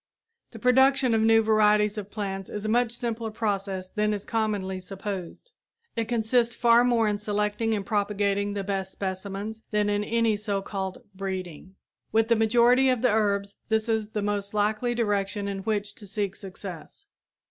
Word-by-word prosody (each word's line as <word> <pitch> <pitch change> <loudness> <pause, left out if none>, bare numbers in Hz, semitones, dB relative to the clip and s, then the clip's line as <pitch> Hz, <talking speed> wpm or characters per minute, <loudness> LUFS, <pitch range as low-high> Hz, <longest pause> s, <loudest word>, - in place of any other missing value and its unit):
The 225 - -11
production 260 +1 +4
of 220 - +3
new 225 0 +5
varieties 210 -1 +3
of 205 -2 -6
plants 195 -3 -4
is 210 0 -5
a - - 0
much 240 +1 +2
simpler 235 -1 -3
process 200 -3 -2
than 210 +1 0
is 200 - -7
commonly 205 -4 -1
supposed. 195 - -7 0.4
It 230 -1 -1
consists 235 +1 +1
far 235 0 +5
more 235 -3 +3
in 205 -1 0
selecting 210 +1 0
and 200 -2 -3
propagating 205 -1 0
the 200 - -2
best 190 -1 -2
specimens 200 +3 -5
than 210 -1 +1
in 205 0 0
any 225 -1 +1
so 205 -2 -2
called 195 +4 -5
"breeding." 190 -2 -6 0.4
With 225 +1 +2
the 230 - +5
majority 240 +4 +4
of 250 -2 +1
the 250 - +4
herbs 200 -2 0
this 220 0 +1
is 220 -2 0
the 210 -2 -3
most 205 0 -2
likely 215 +4 +1
direction 205 -2 -1
in 200 -1 -3
which 205 0 -2
to 205 - -12
seek 200 -1 -2
success. 190 - -9
210 Hz, 170 wpm, -26 LUFS, 200-225 Hz, 0.4 s, new